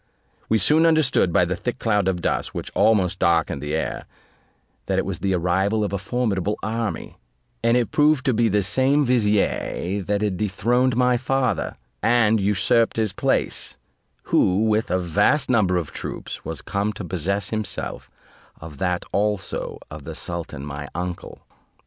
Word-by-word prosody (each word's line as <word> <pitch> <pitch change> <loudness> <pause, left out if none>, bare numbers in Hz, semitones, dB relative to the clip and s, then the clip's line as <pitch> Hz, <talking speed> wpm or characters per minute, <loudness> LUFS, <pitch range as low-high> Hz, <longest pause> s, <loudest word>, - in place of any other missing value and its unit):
We 110 - +4
soon 155 - +4
understood 150 - +3
by 90 - +3
the 90 +2 -2
thick 125 +7 -4
cloud 105 -6 +1
of 90 -2 -1
dust, - - -1
which - - -5
almost 95 -4 +2
darkened 80 -5 +1
the 75 +1 -2
air, 80 - -3 0.8
that - - 0
it - - +1
was - - -4
the 95 -1 0
arrival 95 +5 +1
of 100 - -3
a 100 - -1
formidable 105 -2 -1
army: 115 0 -3 0.4
and 115 +1 +4
it 120 - 0
proved 150 -3 +3
to 130 - +3
be 115 0 +2
the 105 0 +2
same 130 +9 +3
vizier 105 -4 0
that 100 +2 -1
had 100 -3 -1
dethroned 120 +5 +1
my 125 -1 +3
father, 130 -3 -1 0.2
and 115 -2 +3
usurped 105 +4 +2
his 110 -3 0
place, - - -1 0.5
who 95 +4 +2
with 110 0 +1
a 90 - +2
vast 105 - +1
number 95 -7 +3
of 85 -4 -3
troops - - -6
was 80 -3 -6
come 100 +2 -1
to 100 - -7
possess 95 +4 -2
himself 110 -3 -4 0.5
of 75 -3 -10
that 90 -1 -1
also 105 -2 -2
of 75 -1 -8
the - - -6
sultan 80 -5 -6
my 70 0 -6
uncle. 90 0 -5
105 Hz, 165 wpm, -23 LUFS, 90-115 Hz, 0.8 s, We